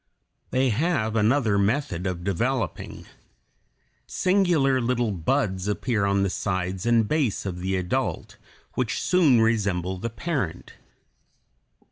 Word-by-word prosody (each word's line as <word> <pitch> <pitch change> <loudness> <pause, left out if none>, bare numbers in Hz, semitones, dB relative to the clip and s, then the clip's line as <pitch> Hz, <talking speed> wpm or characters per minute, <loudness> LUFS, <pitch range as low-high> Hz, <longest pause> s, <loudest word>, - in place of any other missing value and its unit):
They 130 0 +2
have 115 -3 0
another 110 -1 +2
method 100 - 0
of 90 -2 -4
developing. 115 +7 -2 1.0
Singular 175 -9 +2
little 120 -2 0
"buds" 95 +2 -1
appear 105 +1 0
on 100 0 +2
the 100 - +1
sides 95 +1 -2
and 115 -2 +3
base 140 -10 0
of 90 -2 -4
the 95 +1 -1
adult, 90 -1 -2 0.4
which - - -1
soon 155 -10 +4
resemble 95 -5 0
the 115 - -3
parent. 115 - -4
110 Hz, 115 wpm, -25 LUFS, 95-130 Hz, 1.0 s, soon